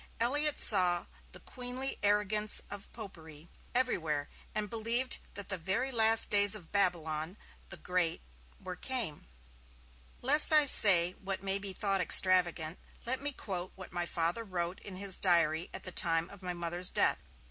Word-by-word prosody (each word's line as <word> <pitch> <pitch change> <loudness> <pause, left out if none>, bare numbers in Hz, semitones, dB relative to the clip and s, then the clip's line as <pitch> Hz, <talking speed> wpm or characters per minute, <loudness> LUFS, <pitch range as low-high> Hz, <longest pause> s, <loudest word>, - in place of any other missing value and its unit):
Elliott 290 +5 +1
saw 180 -4 +2 0.3
'the - - -12
queenly 255 +1 -4
arrogance 210 +1 0
of 200 -1 -9
Popery' 165 -7 -11 0.3
everywhere, 160 - -2 0.3
and 215 -1 -2
believed 230 +4 0 0.2
that 200 0 -6
the 195 -2 -3
very 215 +11 -2
last 225 -2 +3
days 205 0 +4
of 180 -6 -11
Babylon 170 -3 -1 0.3
the 190 - -7
Great 180 -2 -2 0.4
were 185 -1 -8
came. 225 - -3 1.0
Lest 295 +5 +5
I 305 -1 +5
say 180 -9 +5
what 195 0 -5
may 195 0 -2
be 200 -1 -2
thought 195 0 -1
extravagant, 175 -3 +4 0.3
let 260 +3 -2
me 290 +1 -2
quote 185 -8 -7
what 185 -1 -12
my 175 -1 -3
Father 170 +7 -3
wrote 180 -3 -5
in 195 - -10
his 195 0 +1
diary 170 -3 +1
at - - -9
the 185 - -4
time 165 0 0
of 200 -1 -14
my 180 -1 -5
Mother's 175 +1 +3
death. - - +1
190 Hz, 160 wpm, -30 LUFS, 175-220 Hz, 1.0 s, Lest